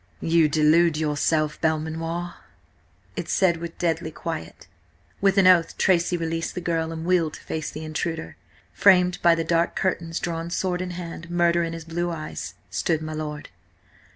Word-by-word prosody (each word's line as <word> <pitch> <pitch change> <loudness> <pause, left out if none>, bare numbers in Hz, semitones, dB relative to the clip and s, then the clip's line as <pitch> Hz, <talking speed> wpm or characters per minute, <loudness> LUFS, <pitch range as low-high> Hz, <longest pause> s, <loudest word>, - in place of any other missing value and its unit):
"You 165 -1 +3
delude 155 +2 +4
yourself, 155 0 0
Belmanoir," 165 +2 -2 0.8
it - - -5
said 175 -3 +3
with 170 0 -7
deadly 165 -2 -1
quiet. 155 - -6 0.6
With 195 0 +3
an 195 - +5
oath 180 -3 +5
Tracy 175 -1 +2
released 165 0 -3
the - - -2
girl 165 -2 -1
and 160 0 -5
wheeled 170 -4 +2
to - - -12
face 155 -1 -4
the 155 - -7
intruder. 160 +1 -4 0.4
Framed 180 -2 +4
by 170 -1 +5
the 165 - -1
dark 170 +1 +1
curtains, 170 -3 -1
drawn 165 -1 -3
sword 180 0 -1
in 185 - -3
hand, 170 -1 -7
murder 175 0 +2
in 165 0 -3
his 165 -1 -7
blue 175 +1 -2
eyes, 155 - -6 0.2
stood 160 -2 0
my 155 0 -5
lord. 150 -1 -5
165 Hz, 165 wpm, -24 LUFS, 160-175 Hz, 0.8 s, an